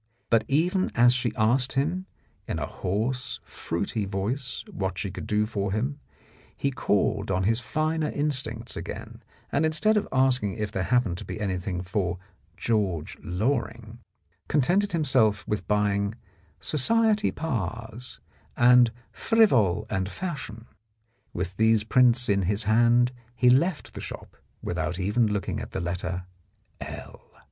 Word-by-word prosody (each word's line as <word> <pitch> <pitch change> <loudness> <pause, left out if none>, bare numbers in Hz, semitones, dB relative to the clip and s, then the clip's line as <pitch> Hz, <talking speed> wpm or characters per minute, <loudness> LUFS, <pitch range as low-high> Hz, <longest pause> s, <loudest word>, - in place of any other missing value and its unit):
But, 115 -2 +4
even 175 +7 +2
as 120 0 +6
she 125 -2 0
asked 125 +4 +2
him 170 +8 -1 0.4
in - - -2
a - - -2
hoarse, 115 +7 -2
fruity 100 +5 -3
voice 110 +7 -3
what 95 -2 -3
she 95 0 -2
could - - -7
do 105 0 +2
for 100 -3 -2
him, 130 +8 -2 0.6
he 140 - 0
called 105 -4 0
on 95 -1 +1
his 115 +4 +2
finer 155 +3 -1
instincts 130 -6 -1
again, - - -7 0.3
and 145 - +2
instead 190 +8 +3
of 210 - 0
asking 130 -6 +2
if 105 -2 -3
there 95 - -2
happened 110 -4 +1
to - - -7
be - - -6
anything 90 -2 -2
for 90 -1 -1 0.4
George 100 -9 -1
Loring, 115 - -2 0.5
contented 180 +8 +2
himself 110 -10 +2
with 105 - -2
buying 100 0 +1 0.4
"Society 215 - +2
Pars" 120 - -4 0.4
and 120 -1 +6 0.2
"Frivol 110 - +3
and 95 -3 -2
Fashion." 115 - -6 0.7
With 90 +1 -4
these 110 -1 +4
prints 125 +1 +4
in 100 -1 +2
his 100 +4 0
hand, 120 +3 +4 0.2
he 125 0 +5
left 160 +6 +1
the - - -7
shop - - -8 0.3
without 80 0 -2
even 105 +5 +2
looking 105 -1 -2
at - - -8
letter 90 0 -3 0.5
L. - - -8
115 Hz, 135 wpm, -26 LUFS, 100-135 Hz, 0.7 s, as